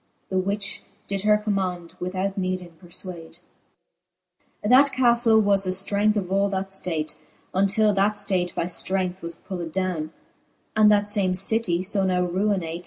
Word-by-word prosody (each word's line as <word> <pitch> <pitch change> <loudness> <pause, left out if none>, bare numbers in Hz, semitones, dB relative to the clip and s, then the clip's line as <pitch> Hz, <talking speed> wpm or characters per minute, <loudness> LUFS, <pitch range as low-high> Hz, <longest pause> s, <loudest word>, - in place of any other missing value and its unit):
The 190 - +2
which 200 +2 -3 0.3
did 195 -1 -2
her 210 +1 +4
command, 190 -5 -2
without 185 +2 -2
needing 185 -2 -3
perfwade. 175 -2 -8 1.3
XXVI. - - +1
That 275 +2 +6
ca{lle 235 -3 +4
was 200 -1 +2
the - - -1
flrength 200 +3 +1
of 190 -3 -2
all 200 +1 +2
that 195 0 -3
{late, 155 -3 -3 0.3
Untill 205 +3 +3
that 200 +2 +1
Hate 180 -3 0
by - - 0
{Irength 185 +1 -2
was 170 0 -6
pulled 175 -3 -6
downe. 180 -4 -2 0.6
And 215 -1 +6
that 205 -1 +3
fame 200 -3 +1
citie, 190 -2 +1
fo 195 0 0
now 180 -1 +1
ruinate. 180 -2 -1
190 Hz, 155 wpm, -24 LUFS, 180-205 Hz, 1.3 s, That